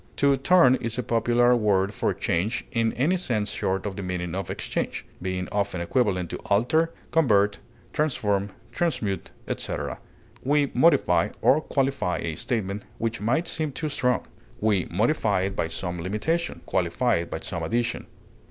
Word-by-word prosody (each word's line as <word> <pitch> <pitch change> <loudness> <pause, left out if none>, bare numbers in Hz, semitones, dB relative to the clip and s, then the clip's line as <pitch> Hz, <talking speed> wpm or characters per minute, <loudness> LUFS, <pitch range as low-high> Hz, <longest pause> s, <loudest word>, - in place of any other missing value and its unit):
To 140 -1 +4
turn 135 -1 +5
is 115 -1 -4
a 125 - -1
popular 120 +2 +3
word 100 -3 +2
for - - 0
change 95 +8 -1
in 115 -1 +1
any 155 +10 +2
sense 110 - -1
short 95 -1 -1
of 100 -2 -3
the 100 - -5
meaning 90 -2 -3
of 95 +1 -3
exchange, - - -3 0.2
being 95 0 -2
often 100 -3 -1
equivalent 90 -2 0
to - - -3
alter, 125 +11 +2 0.2
convert, 105 -10 +3 0.3
transform, 105 -10 0 0.2
transmute, 120 - -1 0.2
etc. - - -3 0.4
We 145 +1 +2
modify 105 - +4
or 155 - +5
qualify 135 - 0
a 80 -1 -3
statement 100 +2 -2 0.2
which 115 0 -2
might 135 +11 +1
seem 155 -3 -2
too 155 +2 -3
strong; 125 -3 0 0.3
we 105 -4 +2
modify 105 - +1
it 95 +1 -2
by 80 - 0
some 85 +1 -4
limitation, 110 - -1
qualify 95 +6 +1
it 85 0 -4
by - - -4
some - - -4
addition. 120 +2 -1
110 Hz, 155 wpm, -25 LUFS, 95-130 Hz, 0.4 s, turn